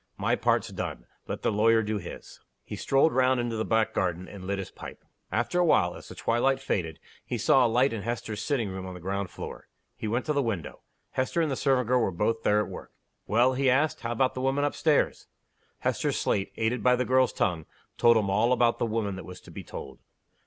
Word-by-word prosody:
My - - +1
part's - - +1
done - - -5 0.2
let - - -5
the - - +2
lawyer 110 +2 +4
do 105 0 -2
his." 85 - -10 0.2
He - - -7
strolled 140 +4 +2
round 130 0 +3
into 120 -1 -2
the 110 - -1
back 110 -1 +1
garden, 90 -1 -1
and 95 -2 -9
lit 100 0 -1
his 95 - -6
pipe. - - -10 0.3
After 120 +10 0
a - - +5
while, 90 - +3
as - - -11
the - - -9
twilight 130 +3 +1
faded, 85 -11 -2 0.2
he - - -3
saw 130 -3 +4
a - - -1
light 125 +3 +3
in 110 - -3
Hester's 110 -1 -4
sitting 125 -8 0
room 95 0 -6
on 90 - -7
the - - -8
ground 95 +2 -3
floor. - - -8 0.3
He 110 - -5
went 120 +4 -1
to 150 - 0
the 140 - +2
window. 110 - -4 0.3
Hester 130 +6 -1
and 160 -3 +1
the - - 0
servant 130 -3 +1
girl 125 0 +3
were 115 - +2
both 105 +5 -1
there 105 0 +3
at 105 - -1
work. - - -9 0.3
"Well?" 120 +4 +3
he 135 0 +2
asked. 145 +5 +2
"How 115 -1 -4
about 130 +2 +1
the 130 - -4
woman 135 +2 +1
up 145 - 0
stairs?" 155 -2 +1 0.5
Hester's - - 0
slate, 95 - 0
aided 115 +2 0
by 125 0 +4
the 125 0 -1
girl's 130 -2 +3
tongue, 80 -3 -1 0.3
told 115 -1 +6
him 105 -3 +1
all 110 +6 +3
about 120 -2 +2
"the 120 - +1
woman" 110 -3 -1
that 95 - -7
was 90 0 -9
to - - -14
be - - -8
told. - - -9
115 Hz, 235 wpm, -27 LUFS, 100-130 Hz, 0.5 s, told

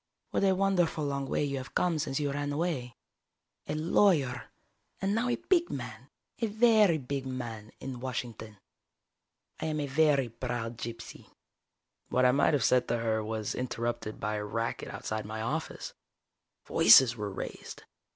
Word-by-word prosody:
"What - - 0
a 190 -1 +4
wonderful 180 -5 +1
long 140 -1 -2
way - - 0
you 140 -1 -2
have 130 0 -8
come 170 -3 +1
since 145 -2 -1
you 145 -1 -1
ran 145 +1 -2
away. 145 -6 -2 0.7
A - - -2
lawyer, 155 - +2 0.5
and 195 +1 0
now 235 +3 +1
a 240 - +2
big 345 -2 +1
man, - - -6 0.3
a 230 - +1
very 215 -5 +4
big 135 -1 -4
man, 115 -4 -6
in 130 -2 -6
Washington. 115 -4 -5 1.0
I - - -2
am 155 -1 -1
a 145 - -1
very 140 -2 +3
proud 120 -1 -4
gypsy." 115 0 -7 0.8
What 130 0 +3
I 125 - +6
might 140 +3 +3
have 135 - +1
said 125 -1 +3
to 120 - 0
her 110 -1 0
was 110 -1 -3
interrupted 120 -3 -3
by 105 +1 -2
a 105 - -3
racket 115 +3 -3
outside 110 0 -4
my 110 +1 -6
office. 155 +7 -4 0.7
Voices 115 +2 +7
were 105 -2 -4
raised. 95 - -7
130 Hz, 160 wpm, -30 LUFS, 115-155 Hz, 1.0 s, Voices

